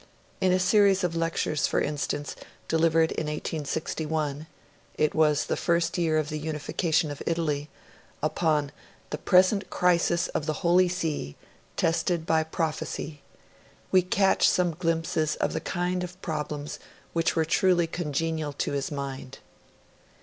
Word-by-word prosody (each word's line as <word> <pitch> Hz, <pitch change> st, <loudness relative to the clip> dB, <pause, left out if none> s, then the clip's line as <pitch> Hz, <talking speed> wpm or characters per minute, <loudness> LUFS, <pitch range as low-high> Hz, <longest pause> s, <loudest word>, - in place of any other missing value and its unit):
In 185 Hz, -, +3 dB
a 185 Hz, -, +4 dB
series 195 Hz, +1 st, +4 dB
of 170 Hz, -2 st, 0 dB
lectures, 165 Hz, -2 st, 0 dB
for -, -, +1 dB
instance, 145 Hz, 0 st, -2 dB, 0.3 s
delivered 160 Hz, 0 st, +3 dB
in -, -, -2 dB
1861 155 Hz, 0 st, -3 dB, 0.5 s
it 155 Hz, -1 st, +2 dB
was 150 Hz, -2 st, +3 dB
the -, -, -1 dB
first 170 Hz, -1 st, +1 dB
year 165 Hz, -3 st, +1 dB
of 155 Hz, -1 st, 0 dB
the 155 Hz, 0 st, -3 dB
unification 155 Hz, +1 st, -1 dB
of 145 Hz, -, -7 dB
Italy 155 Hz, -3 st, -1 dB, 0.5 s
upon 155 Hz, -2 st, +1 dB, 0.4 s
'The 150 Hz, -, -3 dB
Present 190 Hz, +3 st, +3 dB
Crisis 170 Hz, -1 st, +2 dB
of 150 Hz, -, -3 dB
the 155 Hz, +2 st, -3 dB
Holy 180 Hz, +1 st, +5 dB
See, 160 Hz, -, -3 dB, 0.4 s
tested 165 Hz, 0 st, +1 dB
by 160 Hz, -1 st, +3 dB
prophecy', 155 Hz, -2 st, -3 dB, 0.7 s
we 185 Hz, -, +6 dB
catch 190 Hz, +2 st, +3 dB
some 180 Hz, -1 st, +2 dB
glimpses 160 Hz, -2 st, 0 dB
of -, -, -1 dB
the -, -, -2 dB
kind 180 Hz, +1 st, -1 dB
of 180 Hz, +1 st, -8 dB
problems 150 Hz, -3 st, -4 dB, 0.3 s
which 165 Hz, -1 st, +1 dB
were 160 Hz, -1 st, +2 dB
truly 175 Hz, +1 st, +3 dB
congenial 160 Hz, -2 st, -2 dB
to -, -, -2 dB
his 140 Hz, -1 st, -2 dB
mind. 135 Hz, -2 st, -6 dB
160 Hz, 140 wpm, -27 LUFS, 150-175 Hz, 0.7 s, we